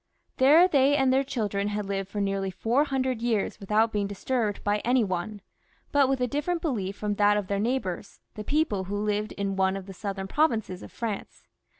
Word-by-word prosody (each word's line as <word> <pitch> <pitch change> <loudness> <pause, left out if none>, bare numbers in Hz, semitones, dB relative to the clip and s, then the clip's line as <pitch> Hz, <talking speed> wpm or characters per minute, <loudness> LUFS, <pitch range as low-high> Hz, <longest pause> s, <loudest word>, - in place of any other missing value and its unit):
There 305 +7 +7
they 280 -4 +4
and 265 -2 +3
their 270 +1 +3
children 205 -6 -2
had 210 0 -2
lived 195 -1 -3
for 205 - -4
nearly 195 -1 -1
four 230 +10 +1
hundred 260 -4 -1
years 230 -4 -1
without 215 +3 +2
being 205 -2 -1
disturbed 210 +1 -2
by 205 0 +1
any 245 +1 +2
one; 195 +2 -3 0.5
but 280 -2 +4
with 270 -1 +1
a 250 - +1
different 295 +7 -1
belief 210 - -2
from 210 -1 -1
that 205 0 +4
of 205 - -1
their 200 +1 -1
neighbours, 215 -6 -2
the 215 - -6
people 280 -8 0
who 200 +2 -3
lived 210 +1 -1
in 200 -1 -2
one 190 0 +1
of 195 - -8
the 195 - -9
southern 195 0 -4
provinces 220 - 0
of - - -11
France. 220 -4 -5
210 Hz, 205 wpm, -27 LUFS, 200-260 Hz, 0.5 s, There